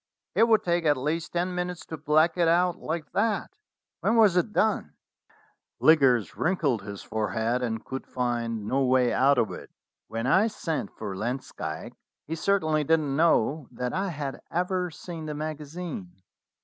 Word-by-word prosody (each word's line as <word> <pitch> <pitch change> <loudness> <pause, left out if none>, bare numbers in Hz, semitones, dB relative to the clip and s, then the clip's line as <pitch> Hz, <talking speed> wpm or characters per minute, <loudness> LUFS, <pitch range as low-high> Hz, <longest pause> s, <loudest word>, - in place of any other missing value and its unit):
It 230 - +4
would 220 -2 +4
take 175 -1 +1
at 145 -2 +4
least 155 +5 -2
ten 175 +1 0
minutes 180 -1 -3
to 160 - -6
black 155 +2 +3
it 175 -2 +2
out 175 +1 +3
like 160 0 -4
that. 210 0 0 0.5
When 225 - +1
was 215 -5 +5
it 180 +4 +2
done?" 215 +1 +1 0.9
Liggers 135 -8 +4
wrinkled 155 - +1
his 100 0 -8
forehead, 110 +3 -1
and 110 -2 -3
could 135 0 -6
find 120 -3 -2
no 135 +5 +1
way 125 -1 +3
out 140 +1 +4
of 115 - +1
it. - - -8 0.4
"When 115 +1 -3
I 190 - +4
sent 170 -7 -3
for 100 -3 -5
Langsdyke 120 +7 -4 0.3
he 160 - -5
cer 200 +5 +2
tainly 155 -3 +1
didn't 150 -2 +1
know 155 -3 +2
that 125 -1 -4
I 195 +1 -1
had 145 -5 -5
ever 180 +1 -1
seen 160 0 -8
the 150 - -4
magazine. 155 - -5
155 Hz, 165 wpm, -27 LUFS, 125-175 Hz, 0.9 s, was